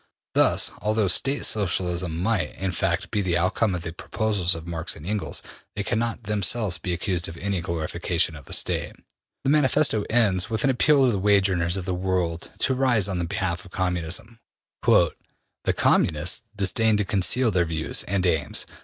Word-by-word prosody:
'' - - -69
Thus, - - +3
although 110 -1 +1
State 135 +10 +2
Socialism 90 -4 0
might, 100 +2 -1
in 95 -1 -2
fact, 85 -1 -1
be 105 - 0
the 90 -3 +1
outcome 95 +3 +1
of 85 - -5
the 80 -1 -5
proposals 100 -1 0
of 80 0 -8
Marx 85 +1 -2
and 75 - -11
Engels, 105 +1 -2 0.3
they 100 - -2
cannot 115 +2 -1
themselves 105 -1 +1
be 90 - -3
accused 90 0 -1
of 85 - -9
any 100 0 -2
glorification 85 0 -1
of 70 -3 -12
the - - -13
State. - - 0 0.5
The 135 - +2
Manifesto 145 -6 +3
ends 100 -5 +3
with 110 -1 -2
an 135 - +4
appeal 140 +2 +4
to 125 - +3
the 100 - -1
wage 100 0 +3
earners 85 0 0
of 95 - -4
the 95 - -2
world 90 -2 -2
to 130 - +2
rise 125 -6 +2
on 90 -3 -2
behalf 85 0 -2
of 95 - -14
Communism. 90 +5 -3 0.4
``The - - +4 0.6
Communists 80 +6 +2
disdain 105 +2 +2
to 105 - 0
conceal 110 +6 +2
their 90 -2 +2
views 80 -1 -1
and 95 -1 -1
aims. 80 -5 0
95 Hz, 180 wpm, -24 LUFS, 85-110 Hz, 0.6 s, an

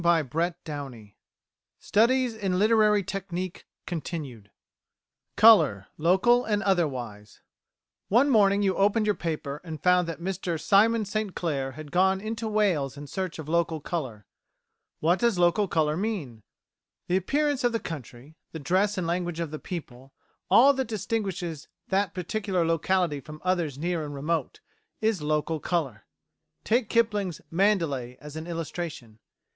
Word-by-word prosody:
CHAPTER 165 +1 +1
VI 135 -9 -7 0.6
STUDIES 245 +3 +2
IN 195 -4 -1
LITERARY 210 0 +4
TECHNIQUE 170 - -6 0.9
Colour: 160 - +6
Local 190 +10 +4
and 210 -1 0
Otherwise 125 - -2 0.7
One 245 +7 +4
morning 205 -3 +4
you 190 -1 +1
opened 205 +3 +2
your 210 - +3
paper 150 -5 -4
and 160 -3 -7
found 180 -1 +4
that 165 - -5
Mr 180 -2 -3
Simon 215 +5 +3
St 210 -1 -3
Clair 135 -6 -2
had 150 0 -10
gone 190 +1 +3
into 220 +2 -4
Wales 185 -11 +1
in 145 - -7
search 185 +4 -4
of 160 -2 -8
local 165 0 0
colour. 130 - -5 0.8
What 170 +4 +3
does 235 -5 +2
local 175 +4 +3
colour 155 -3 +1
mean? 170 - -3 0.7
The 180 - +2
appearance 285 - 0
of 245 - +3
the 230 - -1
country, 140 - -8 0.2
the 160 - -5
dress 190 +7 +1
and 180 - -1
language 175 0 -2
of 165 -3 -3
the 155 - -5
people, 135 -6 -8 0.4
all 275 +4 +7
that 265 -2 -2
distinguishes 195 -7 -3 0.2
the 195 0 +1
particular 185 -1 -1
locality 165 -1 +1
from 155 +2 -11
others 175 -7 0
near 170 +1 -2
and 145 -1 -6
remote 160 +4 -2 0.4
is 220 -5 0
local 155 +1 -1
colour. 140 - -2 0.6
Take 230 0 +1
Kipling's 210 -7 +1
"Mandalay" 165 -10 +1
as 150 0 -10
an 160 +1 -6
illustration. 165 -9 -6
175 Hz, 140 wpm, -27 LUFS, 150-205 Hz, 0.9 s, all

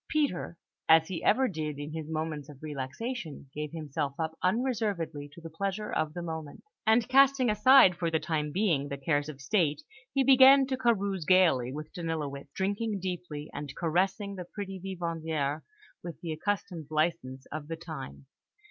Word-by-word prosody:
Peter, 285 - -1 0.3
as 160 0 +7
he 180 -3 -4
ever 260 +5 +4
did 155 - -4
in 145 +1 -6
his 160 -1 -5
moments 155 -2 -3
of 145 - -11
relaxation, 150 - -5
gave 150 0 -4
himself 150 -3 -3
up 160 0 -2
unreservedly 195 - -1
to 155 - -13
the 165 - -8
pleasure 200 +5 -3
of 155 0 -1
the 175 - -4
moment; 160 -3 -6 0.2
and 225 +1 +4
casting 265 -2 +5
aside 210 -3 +7
for 170 -1 -1
the 160 -1 +1
time 150 -2 -2
being 165 -7 +1
the 140 -1 -5
cares 145 +1 0
of 140 -3 -8
State, 150 -1 +1 0.3
he 275 - +2
began 270 +1 +8
to 260 0 -1
carouse 200 -7 0
gaily 165 -9 +4
with 150 +2 -7
Danilowitz, 150 -5 -4
drinking 205 +2 -1
deeply, 175 -5 -5
and 145 -1 -6
caressing 190 +4 0
the 180 -2 -6
pretty 195 +1 -6
vivandières 165 -5 -2 0.4
with 170 -1 -7
the 170 - -4
accustomed 170 -2 -3
licence 155 -5 -1
of 150 -1 -5
the 165 - -4
times. 160 -5 -8
165 Hz, 165 wpm, -29 LUFS, 150-200 Hz, 0.4 s, began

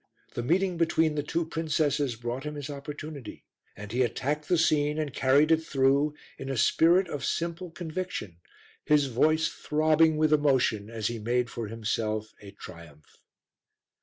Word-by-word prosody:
The - - -3
meeting 180 +7 +1
between 160 -1 +2
the 150 - -1
two 165 +3 -2
princesses 150 -5 0
brought 120 +3 -5
him 150 0 -5
his 145 -1 -6
opportunity 145 -1 -8 0.3
and 105 0 -8
he 125 +2 0
attacked 145 +5 -1
the 180 - +3
scene 150 -2 +2
and 150 -4 -3
carried 140 +4 +3
it 160 0 +4
through 140 +1 +2 0.2
in 135 - -6
a 135 - -2
spirit 175 - +4
of 145 - -5
simple 170 +2 -2
conviction, 165 - -5 0.5
his 150 -1 +3
voice 155 +6 +2
throbbing 155 +1 +2
with 155 0 +3
emotion 130 -8 +2
as 115 -2 -5
he 115 +1 -1
made 120 +2 -1
for 115 -2 -5
himself 110 0 -3
a 100 - -11
triumph. 85 -6 -13
145 Hz, 160 wpm, -28 LUFS, 120-155 Hz, 0.5 s, it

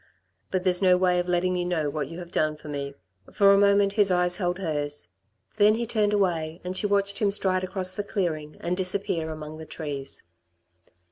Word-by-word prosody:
But 185 -1 -1
there's 180 -1 +3
no 185 -1 +5
way 180 -1 +2
of 175 - -2
letting 180 +1 +1
you 180 - -1
know 175 -4 -1
what 145 -1 -3
you 165 - -9
have 175 -1 -9
done 155 -4 0
for 150 - -13
me." 140 -1 -5 0.4
For 200 -1 +5
a - - +5
moment 200 0 +4
his 205 -2 +3
eyes 180 -1 +2
held 180 -1 -1
hers. 145 - -3 0.5
Then 210 +1 +5
he 235 +1 -2
turned 215 -3 +1
away, 170 -5 0
and 180 +1 -4
she 205 - +1
watched 200 0 0
him 210 - +2
stride 190 -2 +1
across 185 0 0
the 205 - -3
clearing 160 -7 -3
and 175 - -1
disappear 180 -3 0
among 155 0 -8
the 160 - -9
trees. 140 -4 -5
180 Hz, 205 wpm, -26 LUFS, 155-200 Hz, 0.5 s, no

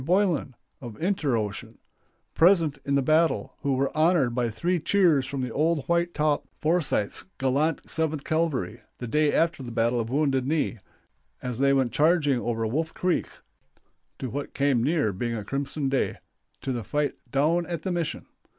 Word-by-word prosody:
Boylan 170 -5 +1 0.3
(of 120 -4 -9
Inter 160 -8 +1
Ocean), 105 -2 -5 0.6
present 165 -4 +4
in 140 - +1
the 140 - +2
battle, 160 +4 +2
who 140 -2 +1
were 135 +1 -1
honored 155 -6 +3
by 120 -1 0
three 175 +12 -1
cheers 165 -6 +3
from 135 -2 -3
"Old 155 +1 +1
White 170 0 +1
Top" 150 -1 +1
Forsyth's 155 -10 0
gallant 140 +4 +1
Seventh 155 -3 -2
Cavalry, 155 -8 -1 0.2
the 125 - -6
day 150 +5 +2
after 165 -3 +1
the 125 - -6
battle 115 +1 +1
of 115 -1 -2
"Wounded 135 -1 +1
Knee," 150 -6 0 0.6
as 125 -1 -4
they 140 0 +4
went 135 -3 +2
charging 150 -4 +3
over 115 -1 -2
Wolf 155 +8 -2
Creek 180 -1 0 0.9
to 130 - -5
what 140 +2 -5
came 140 -4 +2
near 145 -7 +1
being 115 +5 -2
a 105 -3 -5
crimson 140 +3 -2
day 135 -1 0 0.4
to 135 - -2
the 120 -3 -3
fight 145 +7 -1 0.2
"down 160 +7 +1
at 170 -2 -4
the 190 - -2
mission." 170 -3 -2
140 Hz, 170 wpm, -26 LUFS, 125-165 Hz, 0.9 s, present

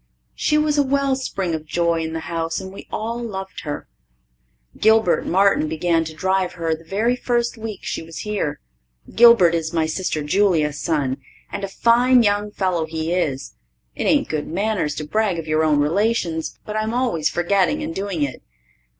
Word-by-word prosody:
She 300 - +1
was 300 -1 +2
a - - +7
well 275 0 +1
spring 195 -9 -3
of 155 -1 -4
joy 170 0 +1
in 160 0 -4
the 160 - -3
house, 165 0 -3
and 190 0 -8
we - - -11
all 230 +2 -3
loved 195 -4 -6
her. 145 -1 -5 0.9
Gilbert 220 -3 +3
Martin 195 -3 +3
began 165 +1 +1
to 160 - -7
drive 190 +2 0
her 165 -2 -1
the 160 +1 -7
very 215 +8 0
first 240 -1 -1
week 220 -3 -6
she - - -3
was 165 0 -8
here. 205 -9 -2 0.5
Gilbert 230 -7 +7
is 165 -1 -2
my 165 -1 +2
sister 160 -1 -2
Julia's 155 -3 +1
son, 145 -5 0 0.3
and - - -5
a - - -1
fine 240 +4 +4
young 205 0 +1
fellow 185 -5 -1
he 160 +1 -2
is. 140 -7 -2 0.4
It - - -4
ain't - - +3
good 155 -2 -3
manners 190 -4 -1
to 155 - -4
brag 200 +3 0
of 165 - -4
your 155 0 +1
own 150 -2 +3
relations, 170 0 0
but 210 - -5
I'm 215 +2 -1
always 235 -12 +1
forgetting 195 - +1
and 320 +2 -4
doing 195 - -2
it. 135 -3 -4
185 Hz, 185 wpm, -21 LUFS, 160-220 Hz, 0.9 s, a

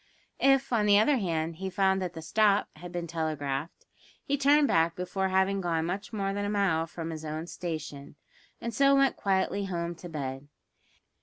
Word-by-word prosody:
If, 270 -1 +3
on 210 -3 +2
the 205 0 +6
other 265 +7 +4
hand, 165 -5 -2
he 190 +1 -4
found 190 0 +2
that 180 -2 -3
the 160 -1 -8
"stop" 205 +3 +3
had 175 +2 -9
been 175 -1 -3
telegraphed, 155 -2 -3 0.4
he 280 - 0
turned 285 +1 +4
back 165 -4 +2
before 190 +1 -2
having 190 +1 +2
gone 165 -2 0
much 190 +4 -4
more 195 -3 -2
than 205 0 -2
a 205 - -1
mile 190 -6 +1
from 165 0 -6
his 155 -1 -7
own 155 +1 -4
station, 155 -5 -6 0.4
and 235 - -4
so 275 +4 +4
went 275 -1 +3
quietly 195 +1 0
home 170 -2 -3
to 175 - -9
bed. 135 -3 -5
180 Hz, 185 wpm, -29 LUFS, 160-205 Hz, 0.4 s, the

